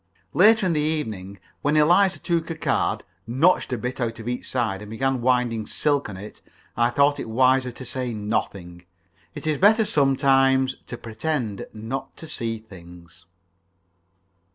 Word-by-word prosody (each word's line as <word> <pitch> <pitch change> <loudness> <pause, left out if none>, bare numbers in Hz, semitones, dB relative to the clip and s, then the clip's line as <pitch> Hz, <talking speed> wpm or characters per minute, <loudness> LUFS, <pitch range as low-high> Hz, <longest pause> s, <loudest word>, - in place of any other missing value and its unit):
Later 215 +3 +5
in 180 - +2
the 155 - +1
evening, 110 -11 -3 0.2
when 145 +2 +1
Eliza 175 +5 +4
took 170 -2 -1
a 165 - -3
card, - - 0 0.2
notched 140 +7 +2
a 125 - -1
bit 125 +3 -4
out 115 -1 -2
of 115 0 -9
each 125 0 -4
side, 110 -6 -1
and 105 - -9
began 130 +3 -1
winding 120 -3 +1
silk 145 -5 0
on 95 - -7
it, 105 +3 -10 0.3
I 120 +1 +3
thought 140 +3 +2
it - - -5
wiser 130 +2 +3
to 125 +2 -9
say 125 -1 -3
nothing. 100 -5 -4 0.5
It - - -7
is 155 -2 0
better 220 +3 +5
sometimes 135 -3 +3
to 120 - -6
pretend 115 -2 -3
not 130 +5 -6
to 160 - -10
see 115 -6 -3
things. 90 -5 -15
130 Hz, 160 wpm, -24 LUFS, 110-150 Hz, 0.5 s, Later